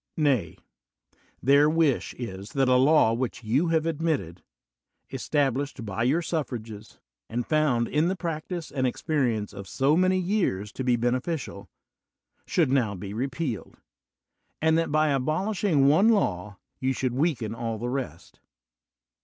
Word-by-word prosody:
Nay, 135 - +1 0.9
their 140 +3 +5
wish 155 -4 +1
is 100 -4 -7
that 135 -2 +2
a 130 - +4
law 130 -2 +5
which 120 0 -3
you 130 +10 +1
have 160 -1 +1
admitted, 155 - -2 0.7
estab 145 -4 0
lished 135 -3 -4
by 100 +1 -4
your 145 +9 +2
suffrages, 115 -10 -5 0.3
and 120 +1 -2
found 145 -7 +1
in 150 +2 +1
tihe 190 - -2
prac 165 -3 -4
tise 175 -3 -5
and 130 -2 0
experience 120 -7 -1
of 100 -1 -8
so 140 +3 +2
many 185 +2 +3
years 175 - -1
to 130 - -5
be 125 -1 +3
bene 120 +2 +1
ficial, 135 - -5 0.8
should 160 -7 +2
now 120 -7 +1
be 100 +2 -7
repealed; 125 - -4 0.8
and 160 +1 +3
that 165 -1 0
by 155 0 +3
abol 155 +8 0
ishing 175 -9 +2
one 165 +10 +5
law 100 - 0 0.2
you 130 0 0
should 130 -1 -2
weaken 130 -6 0
all 115 -1 -3
the 120 +3 -4
rest. 125 - -6
135 Hz, 155 wpm, -26 LUFS, 115-155 Hz, 0.9 s, their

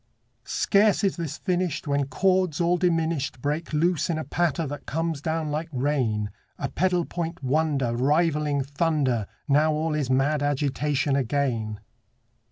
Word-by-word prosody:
Scarce 205 +1 +3
is 195 - +2
this 165 -4 -4
finished 180 -5 -1
When 140 -1 +1
chords 185 +2 +1
all 175 +1 +3
diminished 165 -6 0
Break 150 +5 -2
loose 170 +2 +1
in 165 - 0
a 155 - -2
patter 170 -1 0
that 145 -1 -7
comes 165 -1 -2
down 160 -1 -2
like 155 +2 -3
rain, 125 -7 0 0.3
A - - -3
pedal 180 0 +1
point 170 -3 -5
wonder 135 -3 +1
Rivaling 150 +1 +2
thunder. 140 - 0 0.2
Now 150 +2 +3
all 155 +1 -1
is 145 -4 -1
mad 135 +3 +2
agitation 145 0 0
again. 120 -5 -1
150 Hz, 145 wpm, -25 LUFS, 140-165 Hz, 0.3 s, Scarce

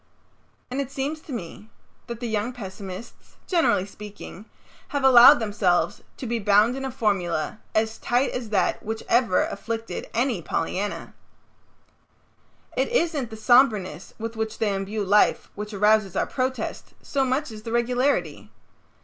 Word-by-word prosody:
And 270 +2 -1
it 270 - -5
seems 285 +3 -3
to 310 - -12
me 215 -1 -7 0.4
that 235 -2 -6
the 240 - -2
young 220 +2 -1
pessimists, 195 -1 -9
generally 330 - +2
speaking, 205 0 -10 0.4
have 285 -2 -2
allowed 260 +2 +9
themselves 195 -6 0 0.2
to - - -6
be 235 0 -1
bound 210 +3 +4
in 270 - -5
a 265 - -2
formula 200 -7 -1 0.2
as 220 +1 0
tight 245 +3 +1
as 240 -3 -5
that 205 -3 +1
which 220 +1 -5
ever 230 -6 +3
afflicted 225 +2 -5
any 235 -5 0
Pollyanna. 190 +5 -3 1.6
It - - +1
isn't 330 - 0
the 220 - -8
somberness 215 - +2
with 225 +1 -5
which 220 0 -3
they 210 -2 0
imbue 200 +2 -3
life 205 +2 +3
which 210 +1 -6
arouses 210 -1 +2
our - - +1
protest, 255 -3 -3
so 275 -1 0
much 265 +1 -1
as 215 -1 -9
the 225 +1 -7
regularity. 245 +4 0
225 Hz, 150 wpm, -24 LUFS, 205-255 Hz, 1.6 s, allowed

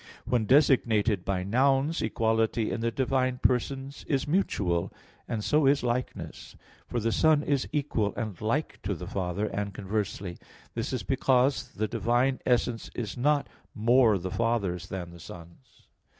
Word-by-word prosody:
When 120 -3 +1
designated 115 - +3
by 95 -1 -1
nouns, 135 - +2
equality 110 0 +1
in - - -3
the 115 - +1
divine 130 +1 0
persons 135 +3 -1
is 140 -1 0
mutual, 100 - 0 0.4
and 110 -2 -3
so 150 +2 +3
is 140 -1 +3
likeness; 125 +1 -4 0.3
for 120 - -2
the 115 +1 0
Son 155 +3 +4
is 140 -3 0
equal 135 -8 0
and 110 -6 -5
like 125 +8 -1
to - - -2
the - - -7
Father, 95 +2 -2
and 100 -1 -3
conversely. 100 -3 -3 0.3
This 115 -1 -3
is 125 -6 -2
because 130 +3 +2
the 110 +1 -1
divine 120 +4 +1
essence 120 -2 +1
is 110 -5 -4
not 145 +3 +1 0.3
more 115 -1 +4
the 95 0 -5
Father's 95 -5 -1
than 90 -3 -6
the 85 - -12
Son's. 85 +8 -13
115 Hz, 150 wpm, -28 LUFS, 100-135 Hz, 0.4 s, Son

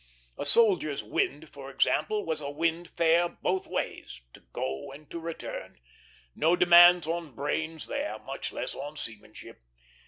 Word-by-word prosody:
A - - -2
soldier's 180 -8 +3
wind, 370 +3 -2
for - - -10
example, 430 -1 +1
was 155 -1 -2
a 140 - -4
wind 165 +3 -1
fair 170 +1 +3
both 185 +2 -2
ways - - -4
to - - -14
go 65 - -4
and 145 +2 -13
to 170 - -5
return; 165 0 -7 0.5
no 165 +3 +3
demands 175 -1 +7
on 165 -4 -4
brains 160 +4 -3
there, 285 +2 -3
much - - -6
less - - -4
on 145 +2 -7
seamanship. 110 -6 -9
165 Hz, 150 wpm, -28 LUFS, 145-175 Hz, 0.5 s, demands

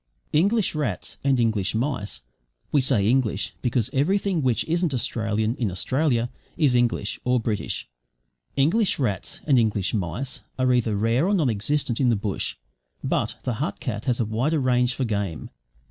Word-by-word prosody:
English 200 +7 +3
rats 155 -2 -3
and 135 -2 +3
English 110 -4 +1
mice 120 -4 -2 0.5
we 145 - +4
say 120 -6 +2
"English" 115 -4 +1
because 120 -3 +1
everything 185 +5 +1
which 125 -4 +1
isn't 170 -3 0
Australian 110 -2 0
in 115 -5 0
Australia, 120 - +1 0.3
IS 145 -6 +3
English 120 -4 +1
(or 125 0 +2
British) 110 -2 -2 0.7
English 175 +10 +3
rats 105 -9 -2
and 135 -5 +5
English 105 -4 +1
mice 110 +6 -3 0.2
are 130 -1 +3
either 115 -3 +1
rare 115 - +2
or 205 - +3
non 150 -10 +2
existent 120 +3 -1
in 125 - +4
the 115 - +4
bush; 100 -1 -2 0.5
but - - 0
the 125 -1 -2
hut 150 - -2
cat 110 -5 -4
has 125 -3 +1
a 120 - +2
wider 125 +9 0
range 125 -1 +2
for 135 - -1
game. 100 -7 -3
125 Hz, 160 wpm, -24 LUFS, 110-140 Hz, 0.7 s, and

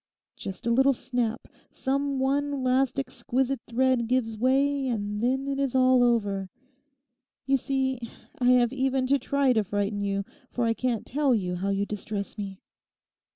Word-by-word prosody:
Just 190 +1 -7
a 235 - +2
little 265 +3 +4
snap, 245 -2 -2 0.2
some 275 +1 -1
one 280 +1 0
last 255 +1 +2
exquisite 265 -1 -1
thread 250 0 +2
gives 235 -2 0
way, 270 +4 +2
and 210 -3 -2
then 265 +3 0
it 275 0 -2
is 275 -2 0
all 255 -1 +5
over. 205 -6 +1 1.0
You 275 0 +3
see 265 -1 -1 0.4
I 250 - 0
have 245 -1 +4
even 265 0 +1
to 275 +2 +3
try 275 0 +2
to 220 -2 +2
frighten 205 +1 -2
you, 200 0 -1 0.2
for 245 - -1
I 230 - +2
can't 235 -2 -2
tell 275 -1 +2
you 180 -4 -1
how 195 +3 -2
you 200 0 0
distress 205 -1 -4
me. 200 -2 -6
250 Hz, 160 wpm, -27 LUFS, 215-270 Hz, 1.0 s, all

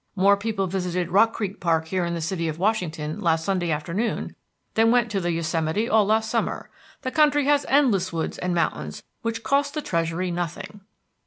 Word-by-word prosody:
More 200 +1 +5
people 200 -1 -2
visited 180 -1 -2
Rock 215 +4 +5
Creek 205 -2 -4
Park 160 -2 0
here 185 -1 0
in 170 0 -2
the 170 - -3
city 165 0 -2
of 155 -1 -3
Washington 170 -6 -1
last 160 -1 +1
Sunday 185 -3 0
afternoon 170 +9 -2 0.4
than 225 +1 +4
went 240 -2 +3
to 200 - 0
the 175 0 0
Yosemite 165 +5 -1
all 215 -3 +3
last 220 +1 +2
summer. - - -2 0.3
The 255 - -2
country 295 -1 +3
has 290 0 +2
endless 230 -10 +3
woods 165 -2 -3
and 180 -1 -1
mountains 75 - -2 0.2
which 230 0 -3
cost 280 +1 +1
the 305 - -1
Treasury 170 +1 -1
nothing." 175 +4 -5
185 Hz, 185 wpm, -24 LUFS, 170-220 Hz, 0.4 s, More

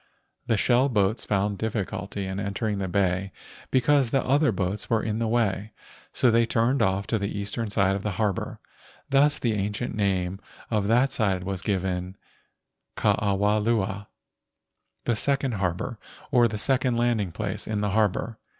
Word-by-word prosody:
The 115 - +2
shell 125 +6 +3
boats 105 -1 +1
found 100 0 0
difficulty 100 -2 -3
in 95 +1 -4
entering 100 +1 -2
the 95 - -2
bay 95 0 0 0.4
because 135 0 +3
the 135 +2 +1
other 140 +1 +3
boats 95 +1 -3
were 115 -2 +2
in 110 0 -2
the 115 - 0
way. 110 -2 0 0.4
So 125 - +3
they 115 0 +3
turned 120 +4 +2
off 95 +1 +1
to 110 +1 0
the 100 +1 -3
eastern 100 +3 -3
side 100 -1 +2
of 100 - -3
the 105 0 -2
harbor. 100 -1 -2 0.5
Thus 145 +2 +4
the 115 -3 0
ancient 105 +3 -2
name 95 -2 0 0.3
of 105 -3 +1
that 125 +5 +3
side 95 -5 0
was 95 -1 -3
given 95 -2 -2 0.8
Ke - - -5 0.2
awa 105 +1 +2
lua 105 -2 -1 1.0
(the 120 - +1
second 135 +3 +1
harbor, 95 +6 -2 0.3
or 120 -3 +5
the 110 -1 -4
second 130 +1 +1
landing 115 -6 +1
place 100 +2 -4
in 105 -1 -1
the 105 -1 0
harbor). 110 +1 0
105 Hz, 165 wpm, -26 LUFS, 100-115 Hz, 1.0 s, or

